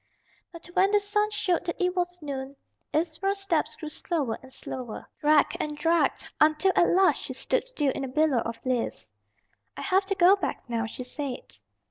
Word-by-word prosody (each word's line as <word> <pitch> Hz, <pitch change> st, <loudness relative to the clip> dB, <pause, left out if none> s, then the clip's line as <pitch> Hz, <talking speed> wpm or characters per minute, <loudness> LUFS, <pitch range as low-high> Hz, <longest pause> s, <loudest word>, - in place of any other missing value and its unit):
But 335 Hz, -1 st, -11 dB
when 380 Hz, +2 st, +4 dB
the 415 Hz, 0 st, +4 dB
sun 420 Hz, +1 st, 0 dB
showed 370 Hz, -5 st, 0 dB
that 340 Hz, -, -3 dB
it 360 Hz, 0 st, +1 dB
was 355 Hz, -2 st, -2 dB
noon, 275 Hz, -1 st, -5 dB, 0.4 s
Ivra's 335 Hz, +5 st, 0 dB
steps 390 Hz, 0 st, 0 dB
grew 310 Hz, -, -7 dB
slower 295 Hz, -7 st, -2 dB
and 260 Hz, -, -14 dB
slower, 250 Hz, -3 st, -7 dB
dragged 300 Hz, 0 st, +4 dB
and 300 Hz, -1 st, -3 dB
dragged, 330 Hz, +2 st, +1 dB
until 310 Hz, +5 st, +4 dB
at 345 Hz, -, +5 dB
last 375 Hz, +1 st, +4 dB
she -, -, -6 dB
stood -, -, 0 dB
still 300 Hz, -, 0 dB
in 275 Hz, -, -4 dB
a -, -, -2 dB
billow 290 Hz, -1 st, +2 dB
of 230 Hz, 0 st, -4 dB
leaves. 255 Hz, -2 st, -2 dB, 0.6 s
"I -, -, -5 dB
have 385 Hz, 0 st, +2 dB
to 390 Hz, 0 st, -1 dB
go 375 Hz, +1 st, +6 dB
back 390 Hz, -, -4 dB
now," 230 Hz, -1 st, -1 dB
she 250 Hz, -, -6 dB
said. 265 Hz, 0 st, -6 dB
320 Hz, 185 wpm, -27 LUFS, 270-380 Hz, 0.6 s, go